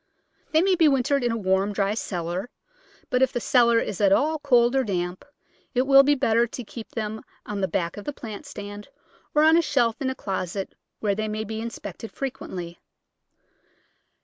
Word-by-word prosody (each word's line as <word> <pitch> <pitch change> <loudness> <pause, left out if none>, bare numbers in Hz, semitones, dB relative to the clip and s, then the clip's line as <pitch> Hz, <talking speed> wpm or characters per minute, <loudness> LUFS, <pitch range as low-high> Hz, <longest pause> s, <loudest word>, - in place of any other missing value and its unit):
They 315 +2 +4
may 385 0 +3
be 335 -3 +5
wintered 275 -1 +2
in 240 - +1
a 230 - -1
warm, 195 0 +1
dry 200 0 +1
cellar, 180 0 -3 0.6
but, 250 - +2
if 265 - +4
the 245 - -2
cellar 235 -1 +4
is 210 -3 -2
at 200 -2 +4
all 305 +9 +2
cold 245 -3 +3
or 265 - +3
damp, 180 -4 -3 0.5
it 250 - +3
will 275 0 +8
be 290 +1 +3
better 235 -3 +2
to 245 +2 -7
keep 225 +1 -9
them 220 -1 -4 0.2
on 205 -1 -4
the 190 - +1
back 170 +1 -2
of 205 - -8
the - - -2
plant 230 0 -8
stand 205 -4 -8 0.5
or 300 - +5
on 320 +1 +6
a - - +5
shelf 240 -7 +1
in 265 - 0
a 260 - -3
closet 190 -2 -4 0.3
where 205 -2 +1
they 215 +2 -2
may 215 0 -3
be 220 +1 -5
inspected 225 -2 -7
frequently. 185 -10 -6
225 Hz, 195 wpm, -25 LUFS, 200-265 Hz, 0.6 s, will